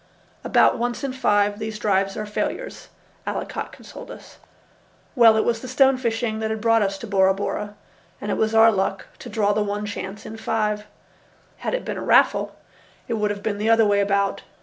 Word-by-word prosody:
"About - - +3
once 240 +3 -2
in 270 -2 -2
five 205 -4 +1
these 220 0 -4
drives 195 -2 0
are 215 - -3
failures," 355 - -4 0.4
Allicot - - -4
consoled - - -12
us. - - -12 0.8
Well, 230 -3 +6
it 220 - +1
was 230 -1 0
the 255 - -7
stone 265 +1 +4
fishing 225 -2 -1
that 220 0 -2
had 220 0 -2
brought 225 0 +3
us 195 -1 0
to 210 - -8
Bora 190 -2 +3
Bora, 205 +1 -4 0.4
and - - -4
it - - 0
was 220 0 0
our 225 0 +7
luck 195 -1 -1
to - - -9
draw 205 -2 +1
the 210 - 0
one 205 0 -2
chance 205 0 -6
in 220 - -8
five. 210 -1 -1 0.7
Had - - -2
it - - -4
been - - -4
a - - -5
raffle, - - +3 0.5
it 240 - -2
would 210 -2 0
have 205 0 -5
been 205 -2 -2
the 215 +2 0
other 225 -1 +5
way 205 -1 +3
about. 200 0 +1
215 Hz, 200 wpm, -23 LUFS, 205-225 Hz, 0.8 s, our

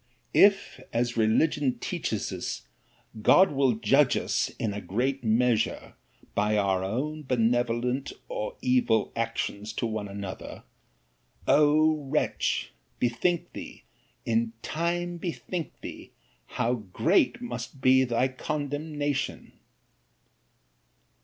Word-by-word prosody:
'If, 200 -1 +4
as 120 +1 0
religion 125 +4 +2
teaches - - -3
us, - - -4 0.6
God 190 - +6
will 135 -3 +3
judge 110 - +3
us, - - 0
in 105 -3 -1
a 105 - -5
great 125 +8 -1
measure! 115 +1 +1 0.4
by 105 +1 +1
our 105 +10 0
benevolent 120 +1 0 0.2
or - - -4
evil 250 - +2
actions 115 -2 -2
to 115 - -2
one 110 -2 -3
another—O 145 - -1
wretch! 150 +3 0 0.3
bethink 125 +9 0
thee, - - -9 0.4
in 115 0 +1
time 175 +2 -2
bethink 170 -1 -5
thee, - - -9 0.3
how 120 +2 0
great 125 - +1
must 235 - -6
be 130 0 +5
thy 125 +1 +1
condemnation. 145 +1 -3
130 Hz, 100 wpm, -27 LUFS, 115-155 Hz, 0.6 s, God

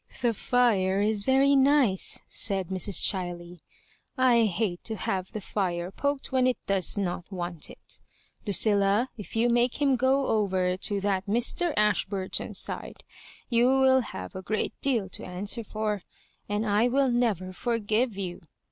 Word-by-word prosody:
" - - -14
The 235 -1 +2
fire 205 -5 +1
is 210 0 +1
very 270 +3 +4
nice," 270 -8 +3
said 190 -3 0
Mrs. 190 -1 +1
Chiley. 175 -2 -1 0.3
" - - -40 0.2
I 230 -1 +4
hate 190 -2 -2
to 220 - -3
have 190 -2 -3
the 215 - -5
fire 180 -3 -3
poked 285 +6 -3
when 255 -1 +2
it 255 - +1
does 195 0 +1
not 180 -1 -3
want 175 -4 -4
it - - -11 0.5
LudUa, 205 +3 +3
if 210 -2 -10
you 230 +2 +3
make 240 +2 +1
him 280 -2 +3
go 265 +2 +2
over 190 -5 0
to 200 +1 -1
that 195 -1 -1
Mr. 240 - +1
Ashburton's 200 -2 0
side, - - -2 0.4
you 240 0 +3
will 265 0 +4
have 95 - -8
a 185 - -6
great 215 +3 -2
deal 235 -8 +1
to - - -6
answer 200 +6 -2
for, 215 -1 -3 0.5
and 205 +2 -1
I 210 +3 +2
will 265 +1 +2
never 210 -7 0
forgive 230 +1 -1
you. 180 -3 -5
210 Hz, 160 wpm, -27 LUFS, 190-245 Hz, 0.5 s, very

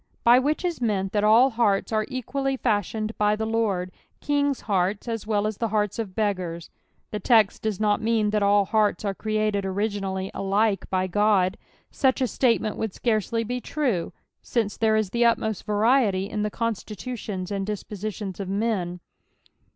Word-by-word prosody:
By 240 +2 +7
which 300 +7 0
is 345 -6 -2
meant 195 -5 0
that 205 -1 0
all 230 +5 +6
hearts 225 -4 +1
are 215 -1 0
equally 270 +1 -2
fashioned 215 -1 -1
by 210 0 +3
the 220 +1 -3
Lord, 210 -5 -1 0.3
kings' 285 -2 0
hearts 195 +1 0
as 225 -2 -4
well 210 -1 +1
as 215 -1 -2
the 230 - -1
hearts 210 0 -1
of 200 -5 -4
beggars. 180 -6 -2 0.4
The 210 - -3
text 215 0 +3
does 215 -3 -2
not 210 0 +2
mean 220 -2 +1
that 210 0 +1
all 200 0 +4
hearts 210 -1 +1
are 200 - 0
created 215 -1 -1
originally 195 -1 -2
alike 200 +1 0
by 185 0 +1
God, 195 -1 +2 0.4
mch 265 -1 +2
a 260 - +2
statement 230 -4 +1
would 220 -4 -3
scarcely 230 0 0
be 245 +2 -3
tru^jince 230 - -3
there 220 -1 +3
is 215 -3 0
the 235 +1 +2
utmost 220 -3 +1
variety 210 -2 +2
in 210 0 -3
the 210 - 0
constitutions 215 -3 -4
and 200 -1 -1
dispositions 210 -1 -5
of 195 -2 -4
men. 195 -4 -1
215 Hz, 165 wpm, -25 LUFS, 200-230 Hz, 0.4 s, By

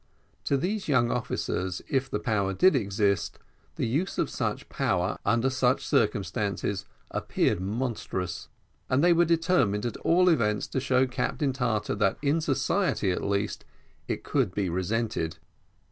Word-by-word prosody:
To 140 - +2
these 190 +8 -2
young 120 -5 +3
officers, 95 -6 -2
if 130 -1 0
the - - -1
power 100 -3 0
did 185 - +5
exist, 100 -3 0 0.4
the - - -1
use 145 +11 -1
of - - 0
such - - -2
power 90 +1 -1
under 120 +3 +2
such 130 0 +1
circumstances 100 0 0 0.3
appeared - - 0
monstrous, 95 -5 -3 0.4
and 130 +4 +2
they 175 0 +6
were 170 +1 +4
determined, 165 - +2
at 120 - -3
all 180 +2 +3
events, 105 - +2
to - - -1
show 130 0 +2
to 130 - -9
Captain 135 +2 -1
Tartar, 115 -5 -1
that 100 -2 +1
in 150 +3 +2
society, 155 - +1
at 90 - -2
least, 100 +1 -1 0.4
it - - -3
could 90 - 0
be 100 -3 0
resented. 95 -2 -1
115 Hz, 150 wpm, -27 LUFS, 100-135 Hz, 0.4 s, they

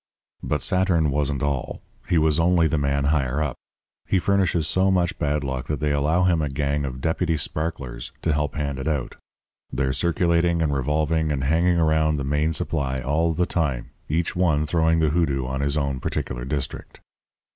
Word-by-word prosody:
"'But - - -2
Saturn 90 -5 +2
wasn't 70 0 -1
all. 70 -3 -2 0.3
He 85 - +3
was 80 0 +3
only 85 0 +4
the 80 -1 0
man 70 0 0
higher 70 -1 +1
up. 70 -5 -3 0.5
He - - +2
furnishes 90 -4 +1
so 95 +3 +2
much 90 -2 +1
bad 75 -1 0
luck 65 -2 -4
that 75 -2 -2
they 75 -1 0
allow 75 +5 +2
him 85 -3 +3
a 75 - -1
gang 70 +1 -1
of 65 -1 -6
deputy 80 +1 0
sparklers 70 -6 -4
to 80 - +2
help 75 0 -1
hand 70 -2 -2
it 65 - -4
out. 75 -5 -2 0.5
They're 65 0 0
circulating 85 +1 +1
and 75 -3 +1
revolving 75 +3 0
and 70 -2 -1
hanging 85 +5 +2
around 80 -1 +2
the 70 - -2
main 75 +3 +1
supply 70 -3 -2
all 75 +6 +1
the 90 - +2
time, 70 -10 -2 0.2
each 80 +3 -1
one 80 -4 +2
throwing 80 +1 +2
the 80 - +3
hoodoo 70 -5 0
on 65 +2 -3
his 70 +1 0
own 70 -3 -1
particular 60 -1 -3
district. 70 0 -4
75 Hz, 185 wpm, -24 LUFS, 70-80 Hz, 0.5 s, only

